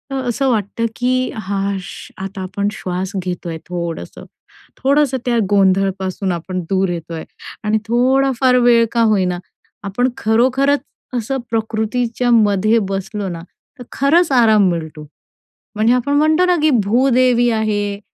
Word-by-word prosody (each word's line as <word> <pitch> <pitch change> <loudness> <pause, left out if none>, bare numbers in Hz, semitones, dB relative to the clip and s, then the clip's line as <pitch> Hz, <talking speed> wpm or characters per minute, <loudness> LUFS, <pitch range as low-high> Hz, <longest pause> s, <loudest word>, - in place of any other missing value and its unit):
असं 260 +1 -1
वाटतं, 225 0 -1
की 255 +1 0
"हा 200 -1 -2
श," - - -10
आता 195 +1 -6
आपण 200 +2 -3
श्वास 185 -1 -4
घेतो 180 -1 -4
आहे 165 - -4
थोडंसं. 170 -2 -6 0.5
थोडंसं 275 0 +2
त्या 240 -1 +1
गोंधळपासून 190 -1 +1
आपण 180 +2 -4
दूर 190 -1 +1
येतो 170 -1 -5
आहे 160 - -6 0.4
आणि 210 +1 +1
थोडाफार 255 +2 +2
वेळ 235 -1 +5
का 235 - +1
होईना 185 -4 +1 0.5
आपण 225 +6 0
खरोखरच 260 +6 +2 0.4
असं 255 +4 -2
प्रकृतीच्यामध्ये 225 -1 +1
बसलो 195 +1 -4
ना, 165 -1 -6 0.4
तर - - -7
खरंच 315 +3 +2
आराम 220 -6 +4
मिळतो. 160 -3 -5 0.7
म्हणजे 220 +3 +3
आपण 250 +3 0
म्हणतो 315 +4 +3
ना, 360 - +3
की 310 - +4 0.2
भूदेवी 245 +1 +3
आहे. 205 -2 -1
220 Hz, 130 wpm, -18 LUFS, 190-250 Hz, 0.7 s, वेळ